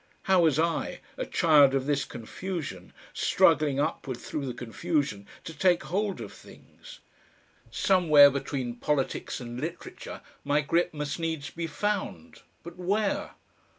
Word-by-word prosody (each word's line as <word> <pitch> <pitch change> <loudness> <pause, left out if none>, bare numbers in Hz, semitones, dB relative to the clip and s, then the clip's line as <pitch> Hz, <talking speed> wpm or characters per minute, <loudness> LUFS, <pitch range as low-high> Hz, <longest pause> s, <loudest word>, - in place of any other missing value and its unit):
How 190 -1 +4
was 160 -4 +3
I, 165 +1 -1 0.2
a - - -4
child 145 -5 +5
of 135 -1 0
this 145 -1 0
confusion, 120 - -6 0.2
struggling 145 -1 +3
upward 135 -3 -2
through 140 +1 -5
the 125 - -3
confusion, 125 - -2 0.2
to 165 - -7
take 175 +3 +2
hold 195 +6 -2
of - - -8
things? - - -15 0.7
Somewhere 155 -7 +6
between 130 -3 -3
politics 140 +1 -1
and 120 0 -7
literature 165 +3 -7 0.2
my 145 +1 +2
grip 170 +4 +1
must 150 0 -4
needs 160 -3 -3
be 170 0 -4
found, 210 +6 -3 0.2
but 170 +1 -10
where? 200 +3 -1
150 Hz, 135 wpm, -28 LUFS, 135-175 Hz, 0.7 s, Somewhere